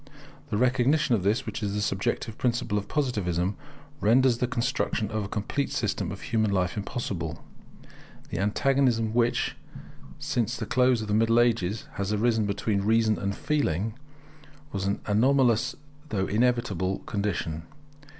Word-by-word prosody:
The 105 Hz, -, -1 dB
recognition 130 Hz, +4 st, +3 dB
of 110 Hz, -, +2 dB
this, 110 Hz, +8 st, +1 dB
which 110 Hz, 0 st, -5 dB
is 100 Hz, -1 st, -2 dB
the -, -, 0 dB
subjective 105 Hz, +2 st, -1 dB
principle 120 Hz, -4 st, 0 dB
of 100 Hz, -, -8 dB
Positivism, 100 Hz, -, 0 dB, 0.4 s
renders 120 Hz, +2 st, +4 dB
the 125 Hz, -, +1 dB
construction 120 Hz, -3 st, -1 dB
of 110 Hz, -1 st, -1 dB
a -, -, -4 dB
complete 105 Hz, +8 st, -2 dB
system -, -, -1 dB
of -, -, -7 dB
human 110 Hz, -2 st, +1 dB
life 90 Hz, -2 st, 0 dB
possible. 85 Hz, -10 st, -4 dB, 0.9 s
The -, -, -2 dB
antagonism 115 Hz, +1 st, +2 dB
which, 120 Hz, 0 st, +1 dB, 0.6 s
since 120 Hz, 0 st, -1 dB
the 110 Hz, -, -3 dB
close 125 Hz, 0 st, +3 dB
of -, -, -6 dB
the 105 Hz, -, -1 dB
Middle 115 Hz, +2 st, +4 dB
Ages, 115 Hz, -4 st, +1 dB
has 100 Hz, 0 st, -1 dB
arisen 110 Hz, 0 st, +2 dB
between 100 Hz, 0 st, 0 dB
Reason 110 Hz, +1 st, +2 dB
and 100 Hz, 0 st, -2 dB
Feeling, 110 Hz, -, 0 dB, 0.8 s
was 100 Hz, -1 st, -2 dB
an 100 Hz, -, -1 dB
anomalous 120 Hz, +2 st, +3 dB, 0.3 s
though 95 Hz, -6 st, 0 dB
inevitable 105 Hz, -5 st, +1 dB
condition. 100 Hz, -7 st, -2 dB
110 Hz, 145 wpm, -27 LUFS, 100-120 Hz, 0.9 s, renders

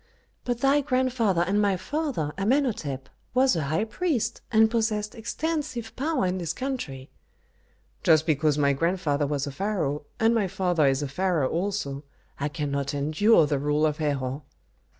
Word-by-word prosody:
"But 245 Hz, -1 st, -2 dB
thy 275 Hz, +2 st, +4 dB
grandfather 255 Hz, -, +1 dB
and 200 Hz, +4 st, +1 dB
my 200 Hz, -2 st, +2 dB
father, 265 Hz, -, -2 dB
Amenhôtep, 200 Hz, -, 0 dB, 0.3 s
was 260 Hz, -2 st, +4 dB
a 160 Hz, -4 st, -1 dB
high 155 Hz, +8 st, 0 dB
priest, 235 Hz, -, -1 dB
and 220 Hz, -1 st, +5 dB
possessed 215 Hz, -2 st, 0 dB
extensive 250 Hz, -1 st, -3 dB
power 280 Hz, -4 st, 0 dB
in 185 Hz, +1 st, -1 dB
this 170 Hz, -3 st, -2 dB
country." 200 Hz, -, -5 dB, 0.9 s
"Just 155 Hz, -1 st, +4 dB
because 155 Hz, -2 st, +2 dB
my 140 Hz, -1 st, +3 dB
grandfather 155 Hz, -2 st, 0 dB
was 140 Hz, -1 st, -1 dB
a 140 Hz, -, -5 dB
pharaoh, 150 Hz, -5 st, -2 dB
and 225 Hz, +1 st, +4 dB
my 220 Hz, -4 st, +1 dB
father 180 Hz, -5 st, +1 dB
is 135 Hz, +1 st, +1 dB
a -, -, -2 dB
pharaoh 165 Hz, -1 st, 0 dB
also, 170 Hz, -6 st, -2 dB, 0.4 s
I 140 Hz, -, 0 dB
cannot 140 Hz, -2 st, -2 dB
endure 155 Hz, +6 st, +4 dB
the 145 Hz, -1 st, 0 dB
rule 150 Hz, +2 st, +1 dB
of 150 Hz, -1 st, 0 dB
Herhor." 140 Hz, -2 st, -1 dB
180 Hz, 155 wpm, -26 LUFS, 145-230 Hz, 0.9 s, and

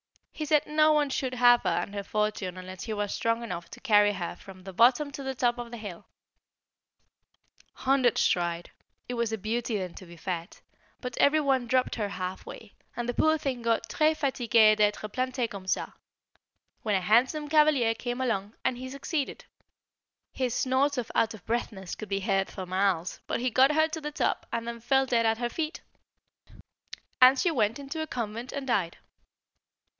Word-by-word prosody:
He 310 Hz, -, -4 dB
said 300 Hz, 0 st, +3 dB
no 305 Hz, +1 st, +4 dB
one 295 Hz, -2 st, +2 dB
should 260 Hz, -1 st, -2 dB
have 245 Hz, 0 st, +6 dB
her -, -, 0 dB
and 200 Hz, -, -2 dB
her 200 Hz, -, -3 dB
fortune 210 Hz, -3 st, -2 dB
unless 185 Hz, 0 st, -8 dB
he 220 Hz, -, -3 dB
was 205 Hz, -1 st, -2 dB
strong 230 Hz, +1 st, 0 dB
enough 175 Hz, -7 st, -6 dB
to -, -, -11 dB
carry 205 Hz, -4 st, +4 dB
her 175 Hz, -3 st, -4 dB
from 185 Hz, -1 st, -13 dB
the 190 Hz, 0 st, -9 dB
bottom 255 Hz, +8 st, +4 dB
to 280 Hz, -, -7 dB
the 265 Hz, -1 st, -4 dB
top 245 Hz, -1 st, +1 dB
of 240 Hz, -1 st, -6 dB
the 235 Hz, -, -7 dB
hill. 205 Hz, -6 st, -9 dB, 1.7 s
Hundreds 260 Hz, -3 st, +2 dB
tried 175 Hz, -1 st, -1 dB, 0.4 s
it 245 Hz, -, -4 dB
was 235 Hz, -2 st, -1 dB
a 220 Hz, -, -1 dB
beauty 220 Hz, +2 st, -2 dB
then 185 Hz, -3 st, -5 dB
to 185 Hz, -, -11 dB
be 170 Hz, 0 st, -13 dB
fat 175 Hz, 0 st, -5 dB, 0.4 s
but 250 Hz, -1 st, -5 dB
every 300 Hz, +2 st, +5 dB
one 265 Hz, -4 st, +1 dB
dropped 255 Hz, +1 st, +1 dB
her 210 Hz, -3 st, -2 dB
half 185 Hz, -1 st, -5 dB
way, 220 Hz, -3 st, -10 dB, 0.2 s
and 240 Hz, 0 st, -2 dB
the 245 Hz, -, -1 dB
poor 315 Hz, +5 st, +3 dB
thing 270 Hz, -5 st, -3 dB
got 230 Hz, -1 st, 0 dB
"très 310 Hz, 0 st, +2 dB
fatiguée 235 Hz, -6 st, +4 dB
d'être 210 Hz, 0 st, +1 dB
plantée 255 Hz, -1 st, -1 dB
comme 195 Hz, -4 st, -9 dB
ça," -, -, -1 dB, 0.9 s
when 210 Hz, -2 st, 0 dB
a 190 Hz, -, +1 dB
handsome 255 Hz, -, +2 dB
cavalier 300 Hz, -6 st, +4 dB
came 245 Hz, +2 st, -4 dB
along, 215 Hz, -5 st, -2 dB
and 245 Hz, -1 st, 0 dB
he 260 Hz, 0 st, -6 dB
succeeded. 275 Hz, +2 st, -4 dB, 0.9 s
His 255 Hz, -3 st, -1 dB
snorts 270 Hz, +2 st, +1 dB
of 240 Hz, -2 st, -3 dB
out 225 Hz, 0 st, +1 dB
of 200 Hz, -, -16 dB
breathness 215 Hz, -5 st, -3 dB
could 215 Hz, -, -7 dB
be 195 Hz, 0 st, -1 dB
heard 195 Hz, -1 st, 0 dB
for 190 Hz, -, -6 dB
miles, 185 Hz, -1 st, 0 dB
but -, -, -1 dB
he 250 Hz, +1 st, -1 dB
got 265 Hz, +5 st, +5 dB
her 315 Hz, +1 st, +4 dB
to 320 Hz, 0 st, -5 dB
the 300 Hz, 0 st, -4 dB
top -, -, -1 dB
and 230 Hz, 0 st, -3 dB
then 235 Hz, 0 st, -5 dB
fell 265 Hz, +3 st, +2 dB
dead 230 Hz, -3 st, +2 dB
at 225 Hz, 0 st, +2 dB
her 240 Hz, 0 st, -2 dB
feet; 315 Hz, +4 st, -4 dB, 1.4 s
and 255 Hz, +2 st, +8 dB
she 345 Hz, -, +2 dB
went 225 Hz, -5 st, +1 dB
into 285 Hz, +3 st, -5 dB
a 315 Hz, -, -3 dB
convent 235 Hz, -1 st, -4 dB
and 280 Hz, -1 st, -5 dB
died. 190 Hz, -9 st, 0 dB
235 Hz, 195 wpm, -28 LUFS, 205-265 Hz, 1.7 s, and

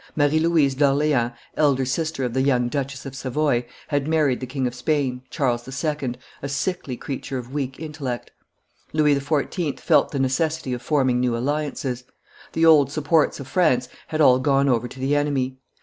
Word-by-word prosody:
Marie 145 Hz, +1 st, +3 dB
Louise 160 Hz, -4 st, +3 dB
d'Orleans, 140 Hz, -3 st, +2 dB, 0.2 s
elder 140 Hz, -4 st, +2 dB
sister 145 Hz, +2 st, -2 dB
of 125 Hz, -2 st, -2 dB
the 130 Hz, -, +1 dB
young 125 Hz, -3 st, +2 dB
Duchess 135 Hz, -1 st, -4 dB
of 135 Hz, -1 st, -7 dB
Savoy, 135 Hz, -2 st, 0 dB, 0.2 s
had 145 Hz, -1 st, 0 dB
married 155 Hz, -5 st, +2 dB
the 130 Hz, -, -5 dB
King 130 Hz, +1 st, -2 dB
of 125 Hz, -, -1 dB
Spain, 130 Hz, -1 st, -1 dB
Charles 120 Hz, -5 st, -1 dB
II., 135 Hz, -2 st, -2 dB, 0.3 s
a 140 Hz, -, -4 dB
sickly 140 Hz, -2 st, -2 dB
creature 135 Hz, 0 st, -5 dB
of 125 Hz, +1 st, -7 dB
weak 135 Hz, -2 st, -3 dB
intellect. 145 Hz, -6 st, -5 dB, 0.6 s
Louis 150 Hz, -1 st, +4 dB
XIV. 145 Hz, +1 st, -1 dB
felt -, -, +3 dB
the 140 Hz, -, -4 dB
necessity 135 Hz, +1 st, 0 dB
of 120 Hz, -, -4 dB
forming 130 Hz, -5 st, +2 dB
new 125 Hz, -2 st, +1 dB
alliances; 135 Hz, -1 st, -2 dB, 0.5 s
the 165 Hz, -, +3 dB
old 150 Hz, -4 st, +6 dB
supports 155 Hz, +1 st, +2 dB
of 135 Hz, -, -7 dB
France 130 Hz, -6 st, +2 dB, 0.2 s
had 155 Hz, 0 st, -1 dB
all 130 Hz, -3 st, +6 dB
gone 140 Hz, 0 st, +2 dB
over 125 Hz, -2 st, +2 dB
to 130 Hz, -, -12 dB
the 135 Hz, +2 st, +1 dB
enemy. 135 Hz, -3 st, 0 dB
140 Hz, 175 wpm, -23 LUFS, 130-150 Hz, 0.6 s, old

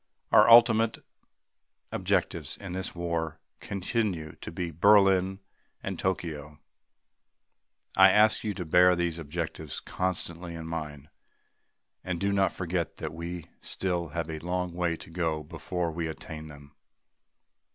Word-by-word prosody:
Our 105 Hz, +2 st, +7 dB
ultimate 115 Hz, -1 st, +6 dB, 0.9 s
objectives -, -, -1 dB
in 95 Hz, -3 st, -7 dB
this 95 Hz, -1 st, -4 dB
war 85 Hz, -2 st, -2 dB, 0.2 s
continue 95 Hz, -5 st, -2 dB
to -, -, -8 dB
be 85 Hz, 0 st, -4 dB
Berlin 95 Hz, +1 st, +4 dB, 0.4 s
and -, -, -4 dB
Tokyo. 75 Hz, -5 st, -3 dB, 1.4 s
I 95 Hz, 0 st, +8 dB
ask 105 Hz, +3 st, +4 dB
you 105 Hz, -3 st, -2 dB
to 90 Hz, -, -4 dB
bear 90 Hz, +3 st, +5 dB
these 85 Hz, -1 st, -1 dB
objectives 80 Hz, -1 st, -4 dB
constantly 85 Hz, -2 st, -3 dB
in 80 Hz, -1 st, -7 dB
mind 75 Hz, -3 st, -6 dB, 0.9 s
and 90 Hz, -2 st, -3 dB
do 100 Hz, +1 st, +1 dB
not 95 Hz, -1 st, +3 dB
forget 85 Hz, -2 st, -3 dB
that -, -, -5 dB
we 85 Hz, +1 st, -6 dB
still 90 Hz, -3 st, -2 dB
have 85 Hz, 0 st, -3 dB
a 80 Hz, -, -5 dB
long 90 Hz, +1 st, -2 dB
way 85 Hz, -1 st, 0 dB
to 80 Hz, -, -12 dB
go 80 Hz, -3 st, -1 dB
before 85 Hz, +2 st, -3 dB
we 80 Hz, +1 st, -3 dB
attain 80 Hz, 0 st, -7 dB
them. 70 Hz, -1 st, -13 dB
85 Hz, 130 wpm, -28 LUFS, 80-95 Hz, 1.4 s, I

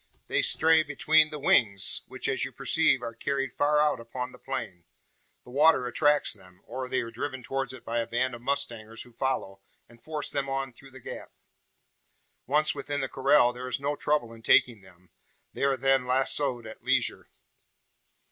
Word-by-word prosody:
They -, -, +1 dB
stray 160 Hz, 0 st, +5 dB
between 155 Hz, +1 st, +3 dB
the 155 Hz, -, -6 dB
wings; 100 Hz, -8 st, +3 dB
which, -, -, -5 dB
as -, -, -1 dB
you -, -, -4 dB
perceive, -, -, +1 dB
are 115 Hz, -, -5 dB
carried 135 Hz, +3 st, -2 dB
far 150 Hz, +1 st, +2 dB
out 150 Hz, -4 st, +2 dB
upon 125 Hz, +2 st, -6 dB
the -, -, -15 dB
plain. 90 Hz, -9 st, -6 dB, 0.6 s
The 125 Hz, -, -14 dB
water 145 Hz, -1 st, +4 dB
attracts 145 Hz, +4 st, +3 dB
them; 90 Hz, -3 st, -11 dB
or 130 Hz, +2 st, -6 dB
they 130 Hz, -, 0 dB
are 115 Hz, -, -7 dB
driven 130 Hz, +2 st, -5 dB
towards 135 Hz, +1 st, -3 dB
it 130 Hz, -, -12 dB
by 115 Hz, +1 st, -1 dB
a 115 Hz, -, -2 dB
band 130 Hz, +2 st, -1 dB
of 120 Hz, -, -9 dB
mustangers 120 Hz, -5 st, -3 dB
who 120 Hz, -, -19 dB
follow, 115 Hz, -6 st, -3 dB, 0.3 s
and 120 Hz, 0 st, -20 dB
force 155 Hz, -2 st, -3 dB
them 140 Hz, -1 st, -2 dB
on 135 Hz, -1 st, -3 dB
through 135 Hz, +3 st, -15 dB
the 130 Hz, 0 st, -13 dB
gap. -, -, -8 dB, 1.2 s
Once 150 Hz, +3 st, +2 dB
within 145 Hz, 0 st, -4 dB
the 135 Hz, -, -3 dB
corral, 130 Hz, -2 st, +3 dB
there 125 Hz, +1 st, -7 dB
is -, -, -2 dB
no 145 Hz, +1 st, -2 dB
trouble 145 Hz, -6 st, -1 dB
in 115 Hz, -, -13 dB
taking 115 Hz, -1 st, +3 dB
them. 90 Hz, -1 st, -19 dB, 0.4 s
They -, -, -1 dB
are 135 Hz, -1 st, +1 dB
then 135 Hz, -2 st, +2 dB
lazoed 130 Hz, -1 st, +1 dB
at 110 Hz, -, -11 dB
leisure." -, -, 0 dB
130 Hz, 185 wpm, -27 LUFS, 115-140 Hz, 1.2 s, stray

